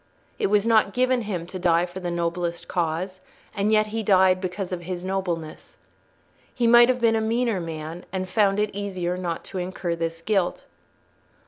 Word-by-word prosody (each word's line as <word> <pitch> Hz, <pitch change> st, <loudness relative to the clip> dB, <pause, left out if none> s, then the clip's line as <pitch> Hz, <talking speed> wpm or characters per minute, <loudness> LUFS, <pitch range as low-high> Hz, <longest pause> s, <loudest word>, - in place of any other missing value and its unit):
It -, -, +2 dB
was 205 Hz, +1 st, +2 dB
not 220 Hz, -3 st, +3 dB
given 255 Hz, 0 st, +2 dB
him 190 Hz, -6 st, -4 dB
to 185 Hz, +2 st, -7 dB
die 175 Hz, -1 st, +3 dB
for 180 Hz, +1 st, -8 dB
the 180 Hz, -1 st, -3 dB
noblest 170 Hz, 0 st, -2 dB
cause, 180 Hz, +2 st, -2 dB, 0.3 s
and 205 Hz, +1 st, +1 dB
yet 215 Hz, 0 st, +4 dB
he 225 Hz, -, -1 dB
died 190 Hz, -3 st, +4 dB
because 185 Hz, 0 st, -4 dB
of 180 Hz, -1 st, -3 dB
his 175 Hz, 0 st, -5 dB
nobleness. 180 Hz, -4 st, -4 dB, 0.7 s
He 245 Hz, -, -1 dB
might 240 Hz, +1 st, +7 dB
have 255 Hz, -1 st, +2 dB
been 230 Hz, -1 st, +3 dB
a 220 Hz, -, +1 dB
meaner 230 Hz, -1 st, 0 dB
man 165 Hz, +1 st, -6 dB
and 185 Hz, 0 st, -3 dB
found 200 Hz, 0 st, +2 dB
it 210 Hz, 0 st, 0 dB
easier 185 Hz, -3 st, -3 dB
not 175 Hz, -2 st, -4 dB
to 190 Hz, -, -6 dB
incur 180 Hz, -1 st, -3 dB
this 165 Hz, 0 st, -4 dB
guilt. 195 Hz, -4 st, 0 dB
185 Hz, 185 wpm, -24 LUFS, 175-210 Hz, 0.7 s, might